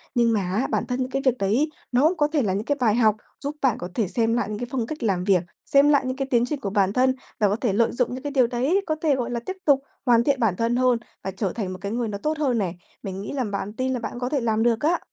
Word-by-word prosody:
Nhưng 235 Hz, -1 st, +3 dB
mà 215 Hz, -, +2 dB
á, 190 Hz, +7 st, -1 dB
bản -, -, 0 dB
thân 250 Hz, 0 st, -2 dB
những 255 Hz, 0 st, -1 dB
cái 270 Hz, +1 st, -1 dB
việc 255 Hz, -1 st, +3 dB
đấy, 225 Hz, +11 st, +1 dB, 0.2 s
nó 280 Hz, +7 st, +4 dB
có 295 Hz, -, +3 dB
thể 300 Hz, -, +3 dB
là 200 Hz, -6 st, 0 dB
những 205 Hz, +3 st, -2 dB
cái 285 Hz, -, 0 dB
bài 220 Hz, -4 st, +3 dB
học 220 Hz, -3 st, +4 dB, 0.2 s
giúp 285 Hz, +1 st, -4 dB
bạn 260 Hz, -6 st, +2 dB
có 175 Hz, -, -5 dB
thể 220 Hz, -5 st, +1 dB
xem 225 Hz, +4 st, +1 dB
lại 235 Hz, -4 st, 0 dB
những 210 Hz, 0 st, -4 dB
cái 245 Hz, -, -4 dB
phong 245 Hz, -4 st, -1 dB
cách 310 Hz, -2 st, -6 dB
làm 190 Hz, -5 st, +1 dB
việc, 185 Hz, -3 st, +3 dB, 0.2 s
xem 280 Hz, +1 st, +5 dB
lại 285 Hz, -2 st, +4 dB
những 255 Hz, 0 st, -2 dB
cái 270 Hz, -1 st, -2 dB
tiến 240 Hz, -1 st, +4 dB
trình 290 Hz, +2 st, -3 dB
của 205 Hz, -, -3 dB
bản 195 Hz, -1 st, +1 dB
thân 260 Hz, +2 st, +3 dB, 0.2 s
và 210 Hz, -2 st, +4 dB
có 200 Hz, -, +1 dB
thể 230 Hz, -2 st, -1 dB
lợi 225 Hz, +3 st, +2 dB
dụng 245 Hz, 0 st, -1 dB
những 255 Hz, -, -6 dB
cái 290 Hz, -, -3 dB
điều 260 Hz, -4 st, +3 dB
đấy, 260 Hz, +11 st, +1 dB
có 310 Hz, -, +1 dB
thể, 300 Hz, -4 st, +3 dB
gọi 245 Hz, -2 st, -3 dB
là, 240 Hz, -, -1 dB
tiếp 375 Hz, -, -5 dB
tục 285 Hz, -3 st, +5 dB, 0.3 s
hoàn 235 Hz, -2 st, +5 dB
thiện 275 Hz, +1 st, +1 dB
bản 220 Hz, -7 st, +2 dB
thân 230 Hz, +4 st, 0 dB
hơn 250 Hz, -1 st, +3 dB, 0.3 s
và 190 Hz, -, -3 dB
trở 190 Hz, 0 st, -2 dB
thành 195 Hz, -5 st, -3 dB
một 185 Hz, -, -8 dB
cái 200 Hz, -, -4 dB
người 235 Hz, 0 st, -1 dB
nó 205 Hz, -2 st, -4 dB
tốt 305 Hz, +9 st, -2 dB
hơn 270 Hz, -6 st, +1 dB
nè. 190 Hz, -6 st, -1 dB, 0.3 s
Mình 195 Hz, 0 st, -5 dB
nghĩ 205 Hz, -, -6 dB
là 270 Hz, -2 st, -1 dB
bạn 205 Hz, -1 st, -4 dB
tin 260 Hz, +3 st, -1 dB
là 250 Hz, -, -2 dB
bạn 240 Hz, +1 st, -5 dB
có 250 Hz, 0 st, -2 dB
thể 280 Hz, -2 st, 0 dB
làm 225 Hz, -1 st, +1 dB
được 230 Hz, -1 st, +2 dB
á. 330 Hz, +4 st, +2 dB
240 Hz, 315 wpm, -24 LUFS, 210-265 Hz, 0.3 s, xem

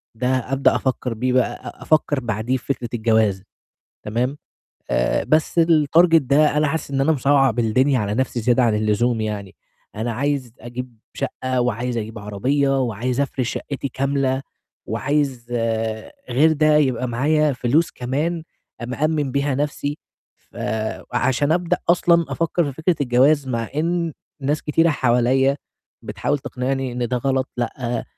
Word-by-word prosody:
ده 125 Hz, +3 st, -2 dB
أبدأ 130 Hz, +1 st, +1 dB
أفكّر 130 Hz, -2 st, -1 dB
بيه 125 Hz, +3 st, -1 dB
بقى 125 Hz, -2 st, 0 dB
أ -, -, -10 dB
أفكّر 150 Hz, -2 st, +2 dB
بعديه 120 Hz, +1 st, -1 dB
في -, -, -15 dB
فكرة 120 Hz, -3 st, -7 dB
الجواز 110 Hz, -4 st, +2 dB, 0.6 s
تمام، 125 Hz, +6 st, -1 dB, 0.5 s
آآ -, -, +1 dB
بس 155 Hz, +2 st, +2 dB
الtarget 165 Hz, +1 st, +4 dB
ده 150 Hz, +1 st, +3 dB
أنا 150 Hz, 0 st, +3 dB
حاسس 160 Hz, 0 st, -3 dB
إن 135 Hz, -1 st, 0 dB
أنا 150 Hz, +4 st, +3 dB
مصعَّب 135 Hz, -3 st, +2 dB
الدنيا 125 Hz, +4 st, +2 dB
على 105 Hz, -2 st, -1 dB
نَفْسي 125 Hz, 0 st, -1 dB
زيادة 120 Hz, +3 st, +3 dB
عن 115 Hz, -3 st, +3 dB
اللزوم 110 Hz, +2 st, +1 dB
يعني، 105 Hz, -3 st, -4 dB, 0.4 s
أنا 115 Hz, +2 st, -2 dB
عايز 135 Hz, 0 st, -2 dB
أجيب 120 Hz, 0 st, -7 dB, 0.2 s
شَقْة 130 Hz, -1 st, -2 dB
وعايز 120 Hz, 0 st, -1 dB
أجيب 110 Hz, 0 st, -5 dB
عربية 135 Hz, +7 st, 0 dB
وعايز 125 Hz, +2 st, -2 dB
أفرش 130 Hz, -3 st, -1 dB
شَقِّتي 140 Hz, -1 st, -4 dB
كاملة 135 Hz, 0 st, 0 dB, 0.4 s
وعايز 140 Hz, -5 st, -1 dB, 0.8 s
غير 150 Hz, +6 st, +4 dB
ده 155 Hz, 0 st, +3 dB
يبقى 130 Hz, -4 st, +1 dB
معايا 150 Hz, +5 st, +2 dB
فلوس 135 Hz, +6 st, +1 dB
كمان 150 Hz, +7 st, -2 dB, 0.4 s
مأمِّن 145 Hz, +2 st, -1 dB
بيها 140 Hz, 0 st, 0 dB
نَفْسي. 145 Hz, +1 st, -2 dB, 0.4 s
فعشان 125 Hz, +6 st, -2 dB
أبدأ 175 Hz, +1 st, +1 dB
أصلًا 170 Hz, -1 st, +4 dB
أفكّر 165 Hz, +1 st, 0 dB
في 140 Hz, -, -3 dB
فكرة 160 Hz, +5 st, 0 dB
الجواز 135 Hz, +2 st, +3 dB
مع 115 Hz, -3 st, -2 dB
إن 170 Hz, +1 st, 0 dB, 0.3 s
ناس 145 Hz, +3 st, -1 dB
كتيرة 165 Hz, +2 st, +2 dB
حواليّا 130 Hz, +1 st, +2 dB, 0.5 s
بتحاول 145 Hz, -, -2 dB
تقنعني 130 Hz, 0 st, -3 dB
إن 120 Hz, -1 st, -2 dB
ده 125 Hz, -, 0 dB
غلط 130 Hz, +1 st, 0 dB
لأ، 120 Hz, 0 st, -3 dB
130 Hz, 145 wpm, -21 LUFS, 120-145 Hz, 0.8 s, الtarget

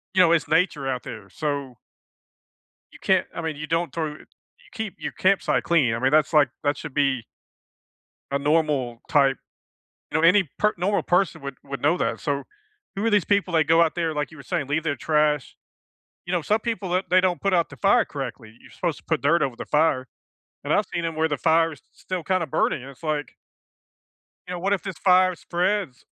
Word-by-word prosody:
You 185 Hz, -, +6 dB
know, 170 Hz, -, +5 dB
it's 170 Hz, -2 st, +2 dB
nature 160 Hz, -4 st, +1 dB
out 130 Hz, -2 st, -2 dB
there, 110 Hz, -5 st, -9 dB
so 140 Hz, +3 st, -3 dB, 1.2 s
you -, -, -15 dB
can't, -, -, +2 dB
I -, -, -3 dB
mean, 160 Hz, -2 st, -3 dB
you 155 Hz, +1 st, -6 dB
don't 165 Hz, +2 st, -1 dB
throw 165 Hz, -2 st, -1 dB
you -, -, -15 dB, 0.5 s
keep 220 Hz, -4 st, -5 dB
your -, -, -4 dB
campsite 195 Hz, +1 st, +2 dB
clean. 145 Hz, -9 st, +2 dB
I 115 Hz, -, -2 dB
mean, 130 Hz, +2 st, +2 dB
that's, 155 Hz, +1 st, +3 dB
like, 150 Hz, -4 st, +5 dB
that 145 Hz, 0 st, +1 dB
should 140 Hz, -, -8 dB
be 135 Hz, -5 st, +1 dB, 1.1 s
a 140 Hz, -, 0 dB
normal 145 Hz, -5 st, 0 dB
type, 135 Hz, -3 st, +3 dB, 0.7 s
you -, -, +1 dB
know 165 Hz, -, +5 dB
any 185 Hz, -2 st, +4 dB
per 210 Hz, 0 st, +3 dB
normal 195 Hz, +4 st, +1 dB
person 180 Hz, -2 st, +1 dB
would 140 Hz, -1 st, -6 dB
would 135 Hz, -1 st, -7 dB
know 150 Hz, +4 st, +3 dB
that, -, -, -1 dB
so, 140 Hz, -2 st, -2 dB, 0.5 s
who 200 Hz, +3 st, -2 dB
are -, -, +3 dB
these 205 Hz, -4 st, +3 dB
people 200 Hz, -3 st, 0 dB
that 160 Hz, -1 st, +4 dB
go 165 Hz, +1 st, +5 dB
out 165 Hz, -2 st, +2 dB
there, 165 Hz, -2 st, -1 dB
like 150 Hz, 0 st, -3 dB
you 155 Hz, -, -13 dB
were 140 Hz, -, -11 dB
saying, 135 Hz, +1 st, -2 dB
leave 150 Hz, +2 st, -1 dB
their 155 Hz, -3 st, -1 dB
trash? 150 Hz, -1 st, +1 dB, 0.7 s
You 175 Hz, -, -4 dB
know, 175 Hz, -, +2 dB
some 215 Hz, +8 st, +1 dB
people 220 Hz, -5 st, -3 dB
that 185 Hz, +2 st, 0 dB
they 185 Hz, 0 st, +6 dB
don't 180 Hz, -2 st, 0 dB
put 195 Hz, -, 0 dB
out 170 Hz, -2 st, +2 dB
the -, -, -12 dB
fire 205 Hz, +4 st, +4 dB
correctly. 120 Hz, -5 st, -7 dB
You're -, -, -17 dB
supposed 170 Hz, -4 st, -2 dB
to -, -, -20 dB
put 160 Hz, -2 st, 0 dB
dirt 165 Hz, +5 st, +3 dB
over 130 Hz, -4 st, -1 dB
the -, -, -7 dB
fire, 150 Hz, -4 st, +1 dB, 0.6 s
and -, -, 0 dB
I've -, -, +2 dB
seen 170 Hz, -1 st, -4 dB
'em 165 Hz, -1 st, -3 dB
where 160 Hz, +1 st, +2 dB
the 145 Hz, -, -1 dB
fire 165 Hz, +2 st, +3 dB
is 145 Hz, -, -12 dB
s -, -, -42 dB
still 185 Hz, -3 st, -5 dB
kinda 185 Hz, -2 st, 0 dB
burning, 130 Hz, -, 0 dB
and 135 Hz, -, -9 dB
it's, 135 Hz, -, -22 dB
like 150 Hz, -4 st, -3 dB, 1.1 s
you 180 Hz, -, -5 dB
know, 180 Hz, -, -4 dB
what 195 Hz, +3 st, +1 dB
if 195 Hz, -, -2 dB
this 190 Hz, -5 st, -6 dB
fire 185 Hz, 0 st, +4 dB
spreads 180 Hz, -5 st, -2 dB
160 Hz, 220 wpm, -24 LUFS, 140-180 Hz, 1.2 s, You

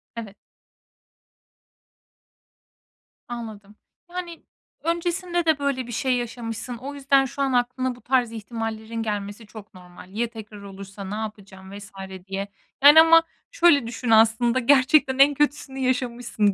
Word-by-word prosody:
Evet. 215 Hz, -4 st, -8 dB, 2.9 s
Anladım. 220 Hz, -4 st, -8 dB, 0.3 s
Yani, 350 Hz, -2 st, -7 dB, 0.4 s
öncesinde 345 Hz, +1 st, -1 dB
de 315 Hz, -3 st, +2 dB
böyle 265 Hz, -3 st, -2 dB
bir -, -, -8 dB
şey 255 Hz, +2 st, 0 dB
yaşamışsın. 235 Hz, 0 st, -5 dB
O 270 Hz, +4 st, -7 dB
yüzden, 275 Hz, -1 st, +3 dB
şu 275 Hz, +2 st, -6 dB
an 270 Hz, -1 st, +1 dB
aklına 250 Hz, +1 st, 0 dB
bu 245 Hz, -, -18 dB
tarz 250 Hz, -3 st, +1 dB
ihtimallerin 225 Hz, 0 st, -5 dB
gelmesi 205 Hz, 0 st, -5 dB
çok 215 Hz, -1 st, -13 dB
normal. 180 Hz, 0 st, -14 dB
Ya 235 Hz, +1 st, +1 dB
tekrar 215 Hz, -3 st, -11 dB
olursa 195 Hz, 0 st, -10 dB
ne 195 Hz, +2 st, -5 dB
yapacağım 200 Hz, -3 st, -8 dB
vs. 205 Hz, +1 st, -11 dB, 0.4 s
diye. 195 Hz, +1 st, -4 dB, 0.4 s
Yani, 295 Hz, +3 st, +10 dB
ama 330 Hz, 0 st, +6 dB, 0.3 s
şöyle 335 Hz, -, +4 dB
düşün, 240 Hz, 0 st, -5 dB
aslında 225 Hz, +3 st, +4 dB
gerçekten 265 Hz, +1 st, +4 dB
en 285 Hz, +1 st, +7 dB
kötüsünü 285 Hz, -2 st, -1 dB
yaşamışsın 245 Hz, -5 st, 0 dB
240 Hz, 130 wpm, -24 LUFS, 215-275 Hz, 2.9 s, Yani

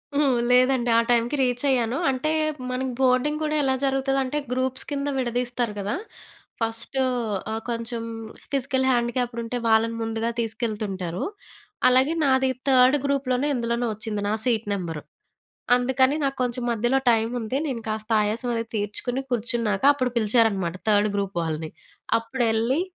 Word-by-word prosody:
హుహు! 295 Hz, +1 st, +3 dB, 0.3 s
లేదండి. 250 Hz, -1 st, +4 dB
ఆ -, -, +6 dB
టైమ్‌కి 240 Hz, +4 st, +2 dB
రీచ్ 250 Hz, 0 st, 0 dB
అయ్యాను. 245 Hz, -1 st, +1 dB
అంటే, 265 Hz, +4 st, 0 dB, 0.4 s
మనకి 255 Hz, +1 st, -2 dB
బోర్డింగ్ 265 Hz, +4 st, +2 dB
కూడా 305 Hz, 0 st, 0 dB
ఎలా 265 Hz, -1 st, +2 dB
జరుగుతదంటే, 270 Hz, +1 st, 0 dB
గ్రూప్స్ 260 Hz, 0 st, -1 dB
కింద 285 Hz, 0 st, -2 dB
విడదీస్తారు 245 Hz, -2 st, -1 dB
కదా! 200 Hz, +2 st, -2 dB, 0.7 s
ఫస్టూ 225 Hz, +4 st, -2 dB, 0.5 s
ఆహ్, 220 Hz, 0 st, -3 dB
కొంచెం 230 Hz, 0 st, -3 dB, 0.5 s
ఫిజికల్ 265 Hz, -1 st, 0 dB
హ్యాండిక్యాప్డ్ 240 Hz, -1 st, 0 dB
ఉంటే 230 Hz, +2 st, -3 dB
వాళ్ళని 225 Hz, +1 st, +3 dB
ముందుగా 225 Hz, +1 st, -1 dB
తీసుకెళ్తుంటారు. 210 Hz, -6 st, -3 dB, 0.7 s
అలాగే 260 Hz, +5 st, +3 dB
నాది 265 Hz, -1 st, +3 dB, 0.2 s
థర్డ్ 260 Hz, +2 st, +6 dB
గ్రూప్‌ 280 Hz, -1 st, 0 dB
లోనే 275 Hz, +4 st, +1 dB
ఇందులో‌నో 235 Hz, 0 st, -1 dB
వచ్చింది 210 Hz, -1 st, -4 dB
నా -, -, +1 dB
సీట్ 230 Hz, -3 st, +1 dB
నెంబరు. 165 Hz, -5 st, -4 dB, 0.7 s
అందుకని 260 Hz, +3 st, +2 dB
నాకు 275 Hz, 0 st, -1 dB
కొంచెం 245 Hz, 0 st, -2 dB
మధ్యలో 240 Hz, +4 st, +1 dB
టైం 225 Hz, 0 st, +1 dB
ఉంది. 225 Hz, +3 st, -3 dB
నేను 240 Hz, -4 st, -4 dB
కాస్త 215 Hz, +1 st, -4 dB
ఆయాసం 225 Hz, +4 st, -2 dB
అది 230 Hz, -, -1 dB
తీర్చుకుని 215 Hz, +5 st, -2 dB
కూర్చున్నాక, 230 Hz, -4 st, 0 dB
అప్పుడు 255 Hz, -3 st, -1 dB
పిలిచారన్నమాట 210 Hz, -6 st, +2 dB
థర్డ్ 210 Hz, 0 st, +3 dB
గ్రూప్ 195 Hz, -2 st, -2 dB
వాళ్ళని. 160 Hz, -1 st, -3 dB, 0.5 s
అప్పుడు 240 Hz, +2 st, -2 dB
ఎళ్లి 230 Hz, +7 st, +1 dB
240 Hz, 140 wpm, -24 LUFS, 220-260 Hz, 0.7 s, ఆ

